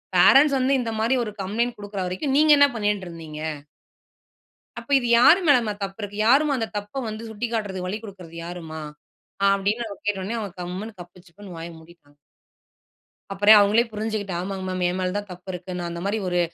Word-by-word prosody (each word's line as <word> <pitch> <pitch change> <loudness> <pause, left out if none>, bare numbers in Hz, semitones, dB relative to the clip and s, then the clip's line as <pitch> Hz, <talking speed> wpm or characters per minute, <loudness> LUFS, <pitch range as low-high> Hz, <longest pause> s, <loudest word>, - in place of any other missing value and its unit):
பே - - +6
ரன்ட்ஸ் 280 0 +4
வந்து 260 +2 +2
இந்த 230 -2 -3
மாதிரி 230 +4 +2
ஒரு 215 - -5
கம்ப்ளைண்ட் 230 +5 -1
கொடுக்குற 205 -1 -5
வரைக்கும் 225 +10 -2
நீங்க 305 +1 +5
என்ன 285 0 +7
பண்ணிட்ருந்தீங்க? 175 -8 -3 1.4
"அப்போ - - -12
இது 245 - -3
யார் 285 +9 +7
மேலமா 240 -7 +4
தப்பு 195 +1 -6
இருக்கு? 205 0 -6
யாரும்மா 285 +4 +4
அந்த 225 -2 -2
தப்ப 205 +6 -5
வந்து 220 +1 -7
சுட்டிக்காட்டுறதுக்கு 210 -4 -3
வழி 195 +3 -3
கொடுக்றது 185 -6 -11
யாரும்மா?" 165 -2 -7 0.7
அப்டினு 200 +4 +1 0.2
கேட்ட 205 -2 0
உடனே 215 +5 -3 0.2
கம்முனு 185 +5 -5
கப்பு 175 0 -13
சிப்புன்னு 185 +1 -12
வாய 165 +1 -7
மூடிட்டாங்க. 160 -3 -20 1.2
அப்புறம் 205 +2 +7
அவங்களே 205 +3 +4
புரிஞ்சுட்டு 215 -2 -3
"ஆமாங் 190 +1 -4
மேம் 185 0 -3
என் 180 - -3
மேல 185 0 -1
தான் 205 -1 -6
தப்பு 180 +1 -11
இருக்கு. 180 +1 -7
நான் 175 -1 -4
அந்த 170 0 -6
மாதிரி 205 +2 0
ஒரு 180 0 0
205 Hz, 175 wpm, -24 LUFS, 180-225 Hz, 1.4 s, என்ன